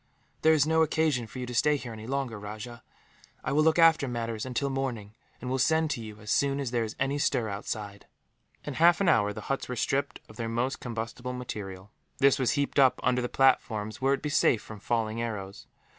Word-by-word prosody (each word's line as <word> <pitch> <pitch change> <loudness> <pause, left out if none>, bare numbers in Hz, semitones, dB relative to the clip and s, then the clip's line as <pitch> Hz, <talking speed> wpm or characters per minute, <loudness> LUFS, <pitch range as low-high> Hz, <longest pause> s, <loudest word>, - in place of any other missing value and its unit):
"There 160 - +5
is 145 -2 +3
no 160 +1 +3
occasion 155 -6 +1
for 110 - -11
you 125 - -3
to 125 - -7
stay 150 +5 +3
here, 125 -4 -7
any 110 0 -9
longer, 130 -5 -2
Rajah. 110 +3 -8 0.6
I - - -2
will 150 +2 +3
look 160 +1 +3
after 165 -4 +5
matters 115 -1 -3
until 135 +2 -1
morning, 125 -6 -3 0.3
and 125 - -7
will 130 +1 -1
send 160 +3 +2
to 120 - -3
you, 110 -1 -9
as 105 - -5
soon 140 0 +2
as 135 -4 -3
there 120 -2 +1
is 110 0 -5
any 135 +2 0
stir 125 -6 +1
outside." 100 0 -6 0.6
In 145 - -5
half 170 +4 +5
an 200 - +1
hour, 105 -10 +4
the 105 - -7
huts 135 +4 -3
were 125 - -3
stripped 135 +4 -1
of - - -15
their 115 -2 -3
most 120 +4 -1
combustible 120 +1 -5
material. 105 -6 -7 0.3
This 140 +1 +4
was 130 - +2
heaped 140 0 0
up 130 -2 +5
under 125 0 +2
the 125 - -2
platforms, 110 -5 +1
where 135 +1 +3
it - - +4
would 135 - -11
be 150 - -1
safe 145 -6 +3
from 110 -2 -10
falling 115 +1 -1
arrows. 100 -4 -5
125 Hz, 225 wpm, -28 LUFS, 110-140 Hz, 0.6 s, There